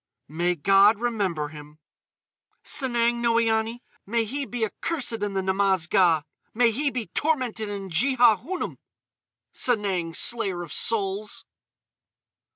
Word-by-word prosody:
"May 175 +3 0
God 195 +6 +5
remember 200 -10 -2
him." 150 0 -12 0.9
"Sanang 240 -3 0
Noïane. 230 0 +1 0.2
May 230 +2 -1
he 275 +4 -4
be 230 0 -1
accursed 240 -2 -3
in 205 -1 -2
the 190 - 0
Namaz 190 -2 +1
Ga!" 175 -6 +3 0.3
"May 235 0 +4
he 280 +6 0
be 245 -4 -4
tormented 255 -8 -1
in 195 -2 -6
Jehaunum!—Sanang, 215 - -1
Slayer 195 -7 +2
of 170 - -8
Souls." 205 -1 -1
215 Hz, 110 wpm, -25 LUFS, 190-240 Hz, 0.9 s, God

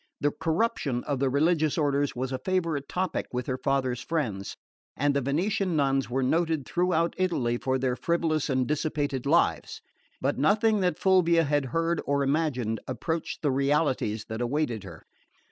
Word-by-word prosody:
The 145 - +1
corruption 160 - -1
of 140 -3 -2
the 135 0 +2
religious 155 +3 +2
orders 145 -2 +1
was 130 +1 -3
a 130 - -2
favourite 165 -6 -1
topic 185 -2 -2
with 125 0 -3
her 130 -1 -3
father's 130 -3 0
friends, 115 -13 -3 0.4
and 145 +1 +2
the 140 - +2
Venetian 180 - 0
nuns 135 -3 +1
were 130 +2 0
noted 160 +1 +1
throughout 175 -2 +1
Italy 135 -11 +1
for 130 0 0
their 130 -1 0
frivolous 160 -1 0
and 130 -1 +1
dissipated 145 -3 -1
lives; 170 +4 +1 0.4
but - - -1
nothing 215 +1 +3
that 180 -4 +1
Fulvia 170 -3 +4
had 145 -2 +1
heard 165 +6 0
or 140 0 +1
imagined 135 -6 0
approached 160 0 -3
the 145 - +2
realities 135 -6 0
that 110 +1 -4
awaited 120 -4 -1
her. 85 -4 -11
145 Hz, 160 wpm, -27 LUFS, 130-165 Hz, 0.4 s, Fulvia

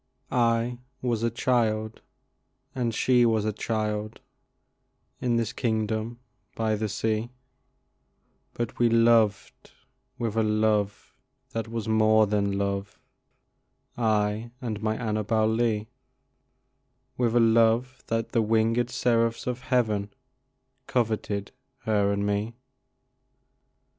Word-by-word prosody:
I 120 0 +1 0.2
was 120 -3 0
a 115 - +2
child, 110 -2 0 0.7
and 120 -3 -1
she 125 +2 +3
was 110 -3 +2
a 110 - 0
child, 110 0 -3 1.0
In 120 -2 0
this 115 -1 -1
kingdom 110 0 -1 0.4
by 110 -1 0
the 105 0 -2
sea, 110 +2 -1 1.3
But 120 -2 -4
we 120 -1 +4
loved 115 -3 +2 0.5
with 115 -3 -2
a - - +4
love 105 -1 0 0.4
that 115 -2 -3
was 115 -1 -4
more 110 0 +4
than 100 -1 0
love, 100 0 -3 1.0
I 110 0 0
and 110 -5 -4
my 110 0 0
Annabel 110 -1 0
Lee, 110 -1 0 1.3
With 120 -2 0
a - - +6
love 115 +2 +3
that 115 0 -1
the 115 - +1
winged 115 +2 +1
seraphs 115 -2 +1
in 125 - 0
heaven 120 -5 0 0.8
Coveted 110 -4 -1 0.3
her 105 -4 +1
and 100 0 -1
me. 105 +3 -1
110 Hz, 110 wpm, -26 LUFS, 105-115 Hz, 1.3 s, a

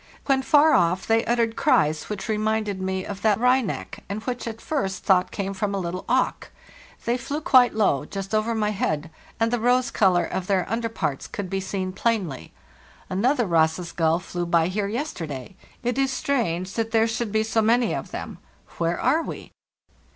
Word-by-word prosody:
When 270 -1 +3
far 300 +3 +5
off 175 +3 +2
they 225 +1 +3
uttered 230 -1 +1
cries 155 +1 +2
which 205 -1 -4
reminded 215 -2 -1
me 190 0 -2
of 200 -1 -6
that 215 -1 +4
of - - -10
the - - -5
wryneck, 250 -4 0
and 200 +2 -3
which 245 -1 -4
I - - 0
at 225 0 -8
first 230 -12 -2
thought 185 -2 +3
came 195 -1 -3
from 200 +1 -2
a - - -1
little 180 0 -4
auk. 255 +1 +1 0.6
They 240 +2 +1
flew 280 +5 -3
quite 255 -6 +5
low, 170 -10 +2
just 195 +4 -6
over 215 +2 +1
my 210 -1 0
head, 160 -5 -2 0.3
and 225 0 +2
the 245 - +1
rose 250 +3 +2
color 185 -4 +3
of 185 -1 -4
their 190 -3 +1
under 230 0 -1
parts 145 -11 -3
could 195 -3 -6
be 195 - 0
seen 190 -1 -3
plainly. 190 - -1 0.6
Another 240 +7 +2
Ross's 165 0 +1
gull 165 -1 +2
flew 175 -1 -4
by 170 0 +3
here 200 +1 -1
yesterday. 190 - -5 0.3
It 245 +2 -1
is 270 0 +2
strange 190 -10 -1
that 225 -1 -1
there 225 0 +3
should 225 -1 -2
be 220 +1 +2
so 225 0 +1
many 235 +2 +3
of - - -4
them. - - -7 0.4
Where 170 0 0
are 290 +6 +2
we? - - -7
210 Hz, 195 wpm, -24 LUFS, 185-235 Hz, 0.6 s, far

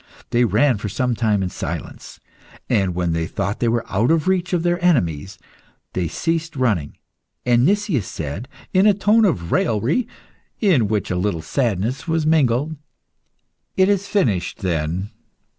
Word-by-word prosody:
They 120 +1 +3
ran 115 +3 +2
for 105 - -4
some 125 +5 0
time 110 -4 +1
in 90 - -2
silence, - - -6 0.5
and 95 -3 +1
when 85 -2 0
they 80 0 -1
thought 100 +1 -3
they 120 - +1
were 115 0 0
out 105 +7 +1
of 165 0 +2
reach 185 -1 +1
of 175 -2 +1
their 175 0 0
enemies, 95 - +1 0.6
they 90 -2 -1
ceased 165 - -2
running, 105 - 0 0.5
and 120 +2 +4
Nicias 200 - +1
said, 80 - -5 0.3
in 190 +3 +5
a 205 - +5
tone 215 +3 +4
of 85 - -1
raillery 120 - +1 0.5
in 165 - +3
which 105 -2 -1
a - - 0
little 90 -3 -1
sadness 120 - -1
was 165 -1 0
mingled 150 -1 +2 1.0
"It 190 +1 +4
is 200 0 +1
finished 120 - 0
then! 85 +3 -2
120 Hz, 160 wpm, -21 LUFS, -, 1.0 s, in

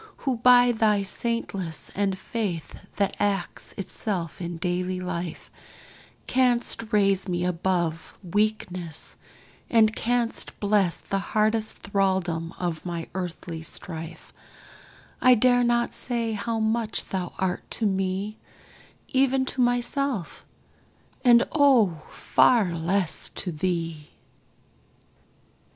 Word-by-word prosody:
who, 260 -3 +1
by 245 +1 +6
thy 215 -3 +2
saintliness 195 - -3
And 195 -1 0
faith 190 -6 -4 0.2
that 200 -1 0
acts 195 -3 -2
itself 190 -3 -4
in 175 -1 -4
daily 180 +1 -1
life, 180 -2 -5 0.7
Canst 245 -3 +1
raise 195 -2 +3
me 175 -1 -1
above 175 -2 -1
weakness, 185 -4 -2 0.5
and 220 -2 +4
canst 240 0 -1
bless 200 -4 +2
The 195 - -2
hardest 215 +2 0
thraldom 190 -4 0
of 175 -3 -3
my 170 -2 -5
earthly 175 -2 -5
strife 165 0 -8 0.9
I 255 0 +7
dare 245 +1 +4
not 240 0 +1
say 235 -2 -2
how 225 +2 -2
much 220 0 0
thou 185 -3 -3
art 185 -1 -2
to 225 - -1
me 195 +2 -1 0.7
Even 265 0 +2
to 260 - -1
myself 245 -3 0 0.8
and 240 -1 +6
O, 240 - +4
far 220 -8 +3
less 170 +2 -1
to 180 - -3
thee! 165 -2 -2
195 Hz, 105 wpm, -26 LUFS, 175-230 Hz, 0.9 s, I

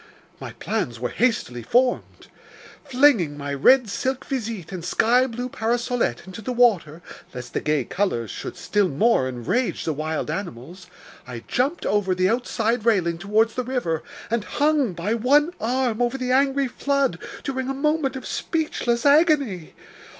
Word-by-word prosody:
My - - -8
plans 120 -1 -3
were 125 0 -2
hastily 205 - 0
formed. 245 - 0 0.6
Flinging 250 - +3
my 140 0 -4
red 250 - +5
silk 260 +5 -2
visite 225 - -4
and 180 -3 -6
sky 240 +8 +3
blue 245 +1 -4
parasolette 235 - -1
into 190 +3 -9
the 235 - -4
water, 195 -10 +2 0.3
lest 125 -1 -8
the - - -1
gay 150 -4 0
colors 150 - -1
should - - -7
still 185 +3 +1
more 160 - +2
enrage 130 - -2
the 160 - 0
wild 155 +1 -3
animals, 175 0 -7 0.4
I 120 -2 -7
jumped 275 +8 -1
over 195 -3 +1
the 185 +1 +2
outside 230 -1 0
railing 180 -7 +1
towards 215 +4 +2
the 255 - -2
river, 235 -11 -2 0.3
and 230 -2 0
hung 290 -4 +1
by 175 +6 -2
one 285 +8 +3
arm 245 0 0
over 245 +2 0
the 255 -1 -2
angry 275 +1 +2
flood 280 +1 0 0.2
during 260 -1 -3
a - - -1
moment 300 -1 0
of 260 - -7
speechless 270 -7 -2
agony! 285 - +3
230 Hz, 155 wpm, -23 LUFS, 175-260 Hz, 0.6 s, red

